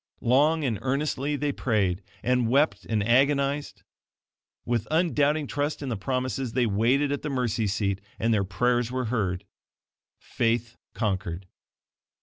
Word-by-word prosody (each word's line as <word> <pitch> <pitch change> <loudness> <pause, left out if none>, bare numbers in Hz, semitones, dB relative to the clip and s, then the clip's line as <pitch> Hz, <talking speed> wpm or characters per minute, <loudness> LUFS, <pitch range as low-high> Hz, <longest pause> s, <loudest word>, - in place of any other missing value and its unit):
Long 150 +6 +3
and 115 -7 -1
earnestly 140 +1 -1
they 145 0 -1
prayed, 105 -8 0 0.2
and 125 -2 +2
wept 140 +5 +2
and 110 -2 +1
agonized. 140 +4 +1 0.8
With 115 -2 -1
undoubting 155 -2 +2
trust 145 +2 -2
in 135 - -3
the 120 - -1
promises, 130 +3 -2
they 125 -1 +2
waited 120 +7 +2
at 145 - -2
the 150 - -3
mercy 120 -5 0
seat, 100 0 -1 0.2
and 115 0 +1
their 105 -2 +2
prayers 120 +5 0
were 130 0 -1
heard. 95 -4 -1 0.7
Faith 115 0 -1 0.2
conquered. 95 -4 -2
125 Hz, 135 wpm, -26 LUFS, 110-140 Hz, 0.8 s, Long